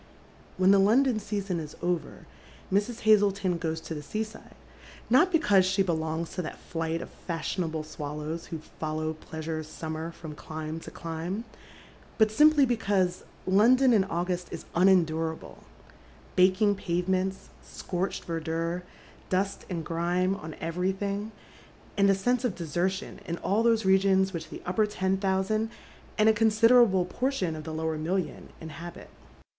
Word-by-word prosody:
When 185 Hz, +1 st, +5 dB
the 200 Hz, -, +6 dB
London 230 Hz, +4 st, +4 dB
eeason 200 Hz, -4 st, -3 dB
is 155 Hz, -2 st, -7 dB
over, 175 Hz, -4 st, -3 dB, 0.5 s
Mrs. 210 Hz, +4 st, 0 dB
Hazleton 200 Hz, -4 st, +3 dB
goes 160 Hz, -1 st, -2 dB
to 160 Hz, -, -6 dB
the 150 Hz, -, -5 dB
ses 215 Hz, +9 st, -4 dB
sirle, -, -, -14 dB, 0.6 s
not 305 Hz, +9 st, +5 dB
because 210 Hz, -, +4 dB
she 190 Hz, +1 st, +2 dB
belongs 160 Hz, -2 st, -2 dB
to 185 Hz, -, -3 dB
that 155 Hz, -, -6 dB
flight 165 Hz, 0 st, -3 dB
of -, -, -10 dB, 0.2 s
fashionable 165 Hz, -1 st, -2 dB
swallow*, 150 Hz, 0 st, -5 dB
who 165 Hz, 0 st, -6 dB, 0.2 s
follow 155 Hz, 0 st, -2 dB
pleasure's 160 Hz, 0 st, -6 dB
summer 160 Hz, +1 st, -5 dB
fi 165 Hz, -, -11 dB
om -, -, -6 dB
clime 155 Hz, +1 st, -6 dB
to -, -, -9 dB
clime, 170 Hz, +6 st, -5 dB, 0.7 s
but 220 Hz, -1 st, +4 dB
simply 300 Hz, +3 st, +6 dB
l^ecause 200 Hz, -7 st, 0 dB, 0.2 s
London 240 Hz, +7 st, +5 dB
in 205 Hz, -4 st, +5 dB
August 180 Hz, 0 st, -2 dB
is 170 Hz, -, -7 dB
unendurable, 165 Hz, -3 st, +1 dB, 0.3 s
— 65 Hz, +2 st, -25 dB
baking 190 Hz, +3 st, +4 dB
pavements, 190 Hz, 0 st, -1 dB
scoi"cb^d 185 Hz, +1 st, -4 dB
v«rdure, 165 Hz, +1 st, -2 dB, 0.5 s
dust 190 Hz, +2 st, -1 dB
and 170 Hz, -4 st, -3 dB
grime 175 Hz, +3 st, 0 dB
on 160 Hz, -6 st, -8 dB
everything, 195 Hz, +5 st, -2 dB, 0.6 s
and 200 Hz, 0 st, +4 dB
a 195 Hz, -, +5 dB
sense 245 Hz, +6 st, 0 dB
of 245 Hz, -7 st, 0 dB
desertiou 180 Hz, +4 st, -2 dB
in 170 Hz, -, -2 dB
all 205 Hz, +3 st, +2 dB
those 230 Hz, -2 st, +3 dB
regions 190 Hz, 0 st, +4 dB
which 160 Hz, -2 st, -5 dB
the -, -, -9 dB
upper 210 Hz, +4 st, +1 dB
ten 190 Hz, -2 st, 0 dB
thousand 195 Hz, +3 st, 0 dB, 0.5 s
and 215 Hz, -, +4 dB
a 220 Hz, -, +7 dB
consider 225 Hz, +3 st, +5 dB
able 190 Hz, -6 st, +3 dB
portion 195 Hz, -5 st, -1 dB
of 155 Hz, -1 st, -8 dB
the 160 Hz, -, -5 dB
lower 160 Hz, 0 st, -2 dB
million 180 Hz, +3 st, -2 dB
inhabit. 165 Hz, +2 st, -9 dB
185 Hz, 150 wpm, -28 LUFS, 165-205 Hz, 0.7 s, a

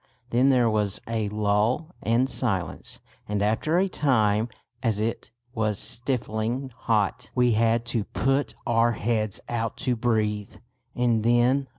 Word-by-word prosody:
Then 125 Hz, +3 st, +4 dB
there 125 Hz, -3 st, +4 dB
was 105 Hz, -3 st, 0 dB
a 110 Hz, -2 st, -1 dB
lull 105 Hz, -, 0 dB
and 120 Hz, +3 st, +2 dB
silence; 100 Hz, -, -3 dB, 0.3 s
and 105 Hz, -1 st, 0 dB
after 110 Hz, +10 st, +1 dB
a 190 Hz, +2 st, +3 dB
time, 110 Hz, -, +2 dB, 0.3 s
as 115 Hz, -4 st, 0 dB
it 115 Hz, +2 st, -2 dB, 0.2 s
was 105 Hz, -2 st, 0 dB
stifling 120 Hz, +1 st, -2 dB
hot, 110 Hz, -4 st, 0 dB
we 125 Hz, -1 st, +4 dB
had 115 Hz, +1 st, +2 dB
to 110 Hz, -4 st, 0 dB
put 135 Hz, +2 st, 0 dB
our 120 Hz, -1 st, +3 dB
heads 110 Hz, -2 st, -1 dB
out 115 Hz, -1 st, -2 dB
to 125 Hz, -, +2 dB
breathe, 105 Hz, -3 st, -1 dB, 0.4 s
and 120 Hz, -3 st, +2 dB
then 120 Hz, +4 st, +3 dB
115 Hz, 140 wpm, -26 LUFS, 105-125 Hz, 0.4 s, Then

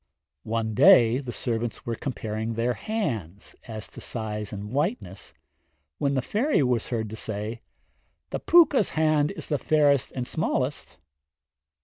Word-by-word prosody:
One 110 Hz, -1 st, -1 dB
day 125 Hz, -, +6 dB
the 130 Hz, -3 st, -6 dB
servants 115 Hz, -3 st, -3 dB
were 120 Hz, -, -2 dB
comparing 110 Hz, -3 st, -4 dB
their 120 Hz, +2 st, 0 dB
hands, 115 Hz, -, -4 dB
as 110 Hz, -3 st, -6 dB
to -, -, -10 dB
size 105 Hz, -2 st, -4 dB
and 105 Hz, +1 st, -6 dB
whiteness, 160 Hz, -, -3 dB, 0.7 s
when 140 Hz, -2 st, +1 dB
the 130 Hz, -, 0 dB
fairy 230 Hz, -, +1 dB
was 125 Hz, -3 st, 0 dB
heard 110 Hz, -3 st, -2 dB
to -, -, -5 dB
say, 110 Hz, +1 st, -5 dB, 0.7 s
'The -, -, -2 dB
Pwca's 300 Hz, -, +5 dB
hand 155 Hz, -2 st, +3 dB
is 165 Hz, -7 st, -6 dB
the 145 Hz, -, -1 dB
fairest 145 Hz, -4 st, +2 dB
and 125 Hz, -1 st, -4 dB
smallest.' 145 Hz, -4 st, -2 dB
125 Hz, 140 wpm, -26 LUFS, 110-150 Hz, 0.7 s, day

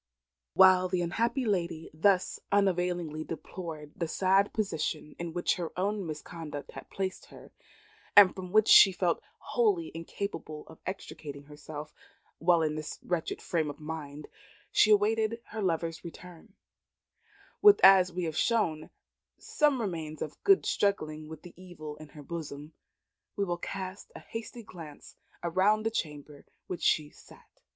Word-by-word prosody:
While 185 Hz, -1 st, +6 dB
the 180 Hz, -1 st, 0 dB
unhappy 235 Hz, +9 st, 0 dB
lady 170 Hz, -6 st, -2 dB
thus 185 Hz, +4 st, +2 dB
unavailingly 180 Hz, -5 st, +1 dB
deplored 160 Hz, -2 st, -7 dB
the 170 Hz, -, -2 dB
sad 190 Hz, +4 st, +2 dB
position 160 Hz, -7 st, -3 dB
in 170 Hz, -1 st, -4 dB
which 175 Hz, +1 st, 0 dB
her 170 Hz, -3 st, -4 dB
own 200 Hz, 0 st, -1 dB
misconduct 150 Hz, -1 st, -7 dB
had -, -, -10 dB
placed 190 Hz, -1 st, -4 dB
her, -, -, -14 dB, 0.6 s
and 200 Hz, -3 st, +9 dB
from 185 Hz, -1 st, -8 dB
which 215 Hz, +1 st, +4 dB
she 195 Hz, -, +9 dB
felt 180 Hz, -1 st, 0 dB, 0.2 s
wholly 405 Hz, -8 st, 0 dB
incapable 165 Hz, -2 st, -6 dB
of 160 Hz, -, -15 dB
extricating 145 Hz, -6 st, -7 dB
herself; 150 Hz, +1 st, -9 dB, 0.5 s
while 170 Hz, -1 st, +4 dB
in 155 Hz, -1 st, 0 dB
this 155 Hz, 0 st, -5 dB
wretched 175 Hz, -3 st, -3 dB
frame 160 Hz, -3 st, -1 dB
of 145 Hz, -, -8 dB
mind, 150 Hz, -2 st, -7 dB, 0.4 s
she 215 Hz, -, +5 dB
awaited 220 Hz, +2 st, +3 dB
her 220 Hz, 0 st, -5 dB
lover's 165 Hz, -3 st, -1 dB
return, 180 Hz, +3 st, -12 dB, 1.1 s
with, 415 Hz, 0 st, +8 dB
as 190 Hz, -1 st, +8 dB
we 180 Hz, +1 st, -3 dB
have 160 Hz, -2 st, -3 dB
shown, 165 Hz, -10 st, 0 dB, 0.5 s
some 295 Hz, -4 st, +1 dB
remains 160 Hz, -8 st, -4 dB
of 155 Hz, -, -9 dB
good 390 Hz, -1 st, +5 dB
struggling 155 Hz, -6 st, 0 dB
with 160 Hz, -1 st, -10 dB
the 175 Hz, -, -12 dB
evil 170 Hz, -5 st, -9 dB
in 155 Hz, -1 st, -12 dB
her 145 Hz, 0 st, -12 dB
bosom, 150 Hz, -1 st, -7 dB, 0.6 s
we 200 Hz, -, 0 dB
will 175 Hz, -2 st, -1 dB
cast 190 Hz, +2 st, -6 dB
a -, -, -7 dB
hasty 225 Hz, +1 st, -8 dB
glance 160 Hz, -7 st, -11 dB, 0.3 s
round 195 Hz, +5 st, +2 dB
the 225 Hz, -, +1 dB
chamber 150 Hz, -6 st, -5 dB
in -, -, -18 dB, 0.2 s
which 180 Hz, -, -6 dB
she 150 Hz, -1 st, +2 dB
sat. -, -, -19 dB
175 Hz, 150 wpm, -30 LUFS, 155-200 Hz, 1.1 s, and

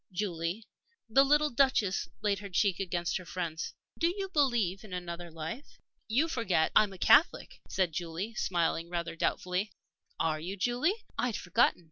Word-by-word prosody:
Julie" 180 Hz, +1 st, -3 dB, 0.4 s
the 260 Hz, +5 st, +5 dB
little 295 Hz, +2 st, +3 dB
Duchess 235 Hz, -7 st, +2 dB
laid 200 Hz, -2 st, +1 dB
her 200 Hz, -1 st, -8 dB
cheek 190 Hz, 0 st, +1 dB
against 175 Hz, -3 st, -1 dB
her 185 Hz, -, -9 dB
friend's 165 Hz, 0 st, -4 dB, 0.2 s
"do 335 Hz, -, +3 dB
you 385 Hz, +2 st, -2 dB
believe 240 Hz, -, +1 dB
in 205 Hz, -4 st, -10 dB
another 175 Hz, -1 st, -5 dB
life?" 165 Hz, -, -7 dB, 0.3 s
"You 255 Hz, +9 st, +2 dB
forget 210 Hz, -, +1 dB
I'm 210 Hz, -2 st, +5 dB
a 190 Hz, -, -10 dB
Catholic," 315 Hz, -, +4 dB
said 185 Hz, -4 st, 0 dB
Julie, 175 Hz, +6 st, -4 dB
smiling 170 Hz, -4 st, 0 dB
rather 170 Hz, -1 st, -3 dB
doubtfully. 180 Hz, +4 st, -1 dB, 0.5 s
"Are 155 Hz, -1 st, +1 dB
you, 185 Hz, +5 st, -5 dB
Julie? 255 Hz, -, 0 dB
I'd 245 Hz, -3 st, 0 dB
forgotten." 180 Hz, 0 st, +2 dB
190 Hz, 155 wpm, -31 LUFS, 170-240 Hz, 0.5 s, the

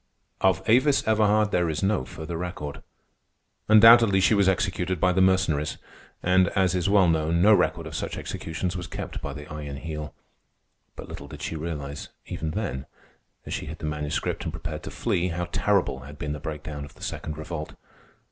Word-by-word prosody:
Of 95 Hz, +1 st, +2 dB
Avis 130 Hz, +5 st, +4 dB
Everhard 105 Hz, -1 st, +3 dB
there 90 Hz, -2 st, +2 dB
is 80 Hz, +3 st, -2 dB
no 95 Hz, -8 st, +1 dB
further 80 Hz, +4 st, -7 dB
record. 80 Hz, -4 st, -5 dB, 0.9 s
Undoubtedly 110 Hz, -2 st, +8 dB
she 95 Hz, +2 st, +4 dB
was 100 Hz, -2 st, +4 dB
executed 95 Hz, -1 st, 0 dB
by 90 Hz, -, +3 dB
the 95 Hz, -, +2 dB
Mercenaries; 90 Hz, -6 st, +2 dB, 0.5 s
and, 90 Hz, 0 st, +4 dB
as 95 Hz, -2 st, +3 dB
is 90 Hz, +1 st, 0 dB
well 100 Hz, -3 st, +5 dB
known, 80 Hz, 0 st, +2 dB
no 105 Hz, +1 st, +7 dB
record -, -, +2 dB
of -, -, -8 dB
such -, -, -4 dB
executions 85 Hz, +3 st, -4 dB
was 90 Hz, -2 st, -5 dB
kept -, -, -6 dB
by 70 Hz, -, -4 dB
the 75 Hz, 0 st, -8 dB
Iron 75 Hz, -2 st, -6 dB
Heel. 75 Hz, 0 st, -6 dB, 0.8 s
But -, -, -9 dB
little -, -, -8 dB
did 75 Hz, -1 st, -9 dB
she -, -, -3 dB
realize, 75 Hz, -3 st, -5 dB, 0.2 s
even 80 Hz, -, -4 dB
then, 65 Hz, -3 st, -3 dB, 0.6 s
as -, -, -5 dB
she -, -, -4 dB
hid 80 Hz, +2 st, -6 dB
the -, -, -6 dB
Manuscript 75 Hz, -1 st, -2 dB
and 80 Hz, -, -3 dB
prepared 80 Hz, -1 st, -6 dB
to -, -, -5 dB
flee, 90 Hz, +1 st, 0 dB
how 90 Hz, 0 st, -2 dB
terrible 100 Hz, 0 st, +1 dB
had -, -, -11 dB
been 75 Hz, -1 st, -3 dB
the 75 Hz, -, -5 dB
breakdown 75 Hz, 0 st, -6 dB
of 70 Hz, -, -11 dB
the -, -, -13 dB
Second 75 Hz, -1 st, -5 dB
Revolt. 80 Hz, 0 st, -6 dB
85 Hz, 185 wpm, -26 LUFS, 75-95 Hz, 0.9 s, Undoubtedly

